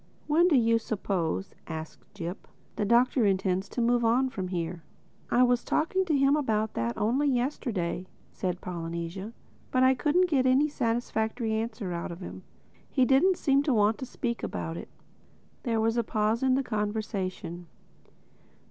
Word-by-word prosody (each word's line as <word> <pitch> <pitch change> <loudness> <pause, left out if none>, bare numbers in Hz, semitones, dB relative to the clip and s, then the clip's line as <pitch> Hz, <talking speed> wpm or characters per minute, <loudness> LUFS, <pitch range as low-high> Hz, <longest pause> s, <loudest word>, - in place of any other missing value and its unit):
"When 325 +4 +4
do 330 - +4
you 230 -2 +4
suppose," 195 -5 -2
asked 160 -1 -8
Jip, 175 -1 -6 0.3
"the 210 - -1
Doctor 240 +3 +4
intends 190 0 0
to 245 - -2
move 240 0 +2
on 245 +3 +3
from 190 -7 -4
here?" 170 -1 -3 0.5
"I 250 - +4
was 245 -1 +3
talking 375 +5 +1
to 310 -5 +2
him 275 +1 +4
about 220 -7 0
that 115 +1 -2
only 260 +7 +2
yesterday," 240 -9 -1 0.2
said 180 -1 -3
Polynesia. 170 +3 -5 0.4
"But 255 0 +2
I 260 0 +6
couldn't 320 +7 +2
get 270 -6 +2
any 270 +4 +4
satisfactory 230 -2 -1
answer 220 -4 -3
out 170 0 -4
of 170 - -8
him. 185 - -8 0.5
He 260 -2 +3
didn't 335 +9 +4
seem 275 -1 +3
to 285 -4 +1
want 210 +1 +3
to 260 - -5
speak 235 -1 -3
about 165 - -4
it." - - -8 0.7
There 230 -3 0
was 225 +1 +1
a 235 - +2
pause 215 +1 0
in 260 -1 +3
the 270 - +1
conversation. 205 -6 -3
225 Hz, 165 wpm, -28 LUFS, 190-260 Hz, 0.7 s, I